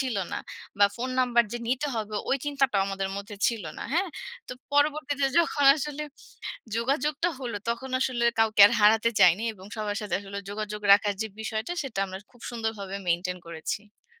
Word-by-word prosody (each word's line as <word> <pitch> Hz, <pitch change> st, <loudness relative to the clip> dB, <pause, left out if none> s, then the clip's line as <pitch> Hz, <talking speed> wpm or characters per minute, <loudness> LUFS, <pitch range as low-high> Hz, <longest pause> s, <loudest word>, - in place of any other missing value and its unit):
ছিল 255 Hz, -5 st, -1 dB, 0.2 s
না। -, -, -1 dB, 0.4 s
বা 200 Hz, -, +7 dB
ফোন 250 Hz, +2 st, -3 dB
নাম্বার 240 Hz, -2 st, +4 dB
যে 240 Hz, -, -3 dB
নিতে 260 Hz, +4 st, 0 dB
হবে, 215 Hz, -1 st, -4 dB, 0.2 s
ওই 270 Hz, -, +4 dB
চিন্তাটাও 275 Hz, -8 st, +1 dB
আমাদের 195 Hz, -1 st, -2 dB
মধ্যে 200 Hz, +1 st, -7 dB
ছিল 225 Hz, -6 st, -1 dB
না। -, -, -5 dB
হ্যাঁ 365 Hz, +4 st, +1 dB, 0.4 s
তো -, -, -4 dB, 0.2 s
পরবর্তীতে 290 Hz, -1 st, +2 dB
যখন 310 Hz, -4 st, +2 dB
আসলে 300 Hz, 0 st, -4 dB, 0.8 s
যোগাযোগটা 290 Hz, +7 st, 0 dB
হলো, 240 Hz, -5 st, -4 dB
তখন 235 Hz, +3 st, -3 dB
আসলে 250 Hz, -2 st, 0 dB, 0.2 s
কাউকে 220 Hz, -2 st, +4 dB
আর -, -, -4 dB
হারাতে 220 Hz, +2 st, +5 dB
চাইনি। 180 Hz, +5 st, +6 dB
এবং 190 Hz, -2 st, -14 dB
সবার 210 Hz, -2 st, -2 dB
সাথে 205 Hz, -4 st, -2 dB
আসলে 200 Hz, 0 st, -6 dB
যোগাযোগ 210 Hz, 0 st, -5 dB
রাখার 205 Hz, 0 st, +3 dB
যে 220 Hz, -, -1 dB
বিষয়টা, 220 Hz, +4 st, -3 dB
সেটা 255 Hz, -8 st, -4 dB
আমরা 190 Hz, 0 st, -7 dB
খুব 245 Hz, -, -21 dB
সুন্দরভাবে 220 Hz, -4 st, -4 dB
মেইনটেইন 180 Hz, +1 st, 0 dB
করেছি। 205 Hz, -, -6 dB
225 Hz, 175 wpm, -27 LUFS, 205-265 Hz, 0.8 s, বা